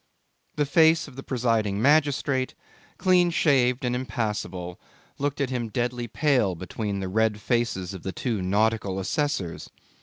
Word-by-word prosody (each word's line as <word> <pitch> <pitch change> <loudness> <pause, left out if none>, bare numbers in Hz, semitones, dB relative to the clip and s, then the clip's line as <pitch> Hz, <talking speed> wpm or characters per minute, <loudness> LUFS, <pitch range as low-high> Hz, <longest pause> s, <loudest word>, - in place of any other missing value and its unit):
The 150 -1 +1
face 160 +2 +4
of 140 - -13
the 135 - -7
presiding 115 -6 0
magistrate, 140 -1 +2 0.4
clean 180 -1 +4
shaved 130 -6 +2
and 120 - 0
impassible, 105 -7 -3 0.4
looked 145 0 -2
at 135 -2 -1
him 120 -3 -2
deadly 120 0 -2
pale 125 - +1
between 100 +3 -4
the 95 - -3
red 110 +2 +1
faces 105 -6 -1
of 95 - -8
the 95 - -4
two 115 -1 -2
nautical 100 0 +1
assessors. 95 - -2
120 Hz, 145 wpm, -25 LUFS, 100-140 Hz, 0.4 s, face